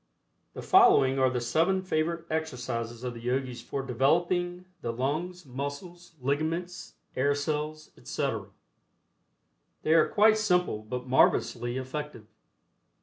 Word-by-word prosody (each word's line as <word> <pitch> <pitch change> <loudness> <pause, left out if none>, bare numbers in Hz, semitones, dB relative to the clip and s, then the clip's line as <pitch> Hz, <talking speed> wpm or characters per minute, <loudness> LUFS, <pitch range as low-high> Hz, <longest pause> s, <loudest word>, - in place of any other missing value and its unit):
The - - -6
following 365 - +5
are 130 -1 +4
the 125 -1 -1
seven 170 +10 +1
favorite 170 -1 -1
exercises 125 -7 -3
of 125 -1 -3
the 115 - -9
Yogis 125 0 -2
for 135 +2 -4
developing 175 +8 +1 0.2
the 115 - -2
lungs, 155 +9 -3
muscles, 145 +7 -7
ligaments, 160 +7 -2 0.2
air 140 +2 +2
cells, 150 +1 -3
etc. - - -3 1.4
They 155 - +3
are 165 -1 +5
quite 215 +1 +4
simple 180 - +1
but 125 +3 -5
marvelously 125 -1 +2
effective. 130 -2 -6
145 Hz, 120 wpm, -28 LUFS, 125-175 Hz, 1.4 s, following